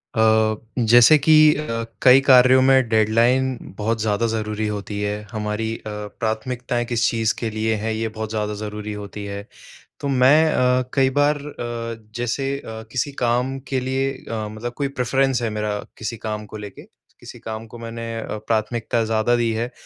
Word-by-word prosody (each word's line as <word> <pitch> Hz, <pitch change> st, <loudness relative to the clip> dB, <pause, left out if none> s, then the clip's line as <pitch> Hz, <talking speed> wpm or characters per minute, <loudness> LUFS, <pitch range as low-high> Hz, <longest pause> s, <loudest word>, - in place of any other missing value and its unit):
अ, 110 Hz, 0 st, +3 dB, 0.3 s
जैसे 120 Hz, +6 st, +8 dB
कि 150 Hz, +2 st, +3 dB, 0.2 s
अ, 115 Hz, -6 st, -3 dB, 0.2 s
कई 130 Hz, +1 st, +8 dB
कार्यों 130 Hz, -1 st, +6 dB
में 130 Hz, -2 st, +4 dB
डेडलाइन 120 Hz, +4 st, +2 dB, 0.2 s
बहुत 110 Hz, +1 st, -1 dB
ज़्यादा 110 Hz, +1 st, +1 dB
ज़रूरी 110 Hz, -1 st, -2 dB
होती 105 Hz, -1 st, -4 dB
है, 105 Hz, 0 st, -1 dB, 0.2 s
हमारी 110 Hz, +1 st, -2 dB
अ, -, -, -20 dB, 0.4 s
प्राथमिकताएँ 120 Hz, +2 st, -2 dB
किस 120 Hz, -1 st, +1 dB
चीज़ 115 Hz, 0 st, 0 dB
के 115 Hz, -, -2 dB
लिए 110 Hz, +1 st, -1 dB
हैं, 110 Hz, +2 st, -2 dB
ये 110 Hz, +1 st, -2 dB
बहुत 110 Hz, -1 st, -3 dB
ज़्यादा 105 Hz, -1 st, -2 dB
ज़रूरी 105 Hz, 0 st, -5 dB
होती 105 Hz, 0 st, -7 dB
है। 100 Hz, +1 st, -6 dB, 0.5 s
तो 140 Hz, -, -3 dB
मैं 135 Hz, +3 st, +5 dB
अ, 125 Hz, -1 st, +2 dB
कई 135 Hz, -2 st, +3 dB
बार 145 Hz, +1 st, +4 dB
अ, 120 Hz, -5 st, -6 dB
जैसे 120 Hz, +3 st, -2 dB
अ, 110 Hz, -4 st, -8 dB
किसी 130 Hz, +4 st, -1 dB
काम 125 Hz, +3 st, +1 dB
के 135 Hz, -, 0 dB
लिए 130 Hz, +1 st, -1 dB, 0.2 s
अ, 110 Hz, -2 st, -3 dB
मतलब 110 Hz, +3 st, -6 dB
कोई 140 Hz, -, 0 dB
प्रेफ़रेंस 130 Hz, 0 st, +1 dB
है 115 Hz, -, -1 dB
मेरा, 105 Hz, -1 st, -2 dB, 0.2 s
किसी 115 Hz, +1 st, -5 dB
काम 105 Hz, 0 st, -5 dB
को -, -, -5 dB
लेके, 105 Hz, -2 st, -9 dB, 0.4 s
किसी -, -, -11 dB
काम 110 Hz, 0 st, -6 dB
को 115 Hz, -, -11 dB
मैंने 115 Hz, 0 st, -6 dB
अ, 110 Hz, -, -5 dB
प्राथमिकता 115 Hz, +1 st, 0 dB
ज़्यादा 110 Hz, +2 st, +1 dB
दी 120 Hz, -1 st, +1 dB
है, 115 Hz, +2 st, -3 dB
115 Hz, 175 wpm, -22 LUFS, 110-125 Hz, 0.5 s, जैसे